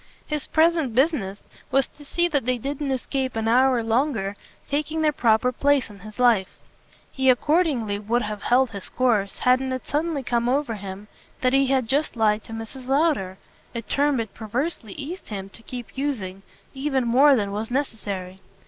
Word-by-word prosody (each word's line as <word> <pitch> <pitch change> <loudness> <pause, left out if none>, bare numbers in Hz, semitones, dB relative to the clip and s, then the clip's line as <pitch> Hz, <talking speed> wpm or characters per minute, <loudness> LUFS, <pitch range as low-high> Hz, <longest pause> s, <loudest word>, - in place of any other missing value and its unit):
His 300 -2 -3
present 320 -6 +2
business 245 - 0 0.2
was 270 0 +2
to 295 - -15
see 345 +4 +1
that 285 -6 0
they 255 0 +2
didn't 280 +3 -3
escape 260 0 -2
an 225 0 -1
hour 250 0 +4
longer 225 -4 0 0.3
taking 305 +2 -1
their 305 - +4
proper 235 -3 +3
place 280 -2 +2
in 200 - -13
his 215 +2 -11
life. 235 -6 +3 0.5
He 265 -1 +2
accordingly 255 - +2
would 235 +4 0
have 210 -1 -4
held 255 0 +3
his 200 -3 -5
course 220 -6 +1
hadn't 260 +1 +2
it 255 - -5
suddenly 300 -1 -1
come 240 -1 0
over 270 -2 +1
him 200 0 -7 0.3
that 255 0 +2
he 270 0 +4
had 260 -3 +1
just 285 +4 0
lied 215 -1 +2
to - - -11
Mrs. 225 +3 -7
Lowder 270 - +1 0.4
a 230 - -3
term 285 +2 +1
it 220 -3 -4
perversely 230 - -3
eased 325 +6 -7
him 195 -2 -6
to 230 - -12
keep 245 0 -8
using 220 -10 -3 0.3
even 270 -2 0
more 270 +4 +6
than 205 -4 -1
was 215 +2 -3
necessary. 200 -8 -3
250 Hz, 175 wpm, -24 LUFS, 220-280 Hz, 0.5 s, more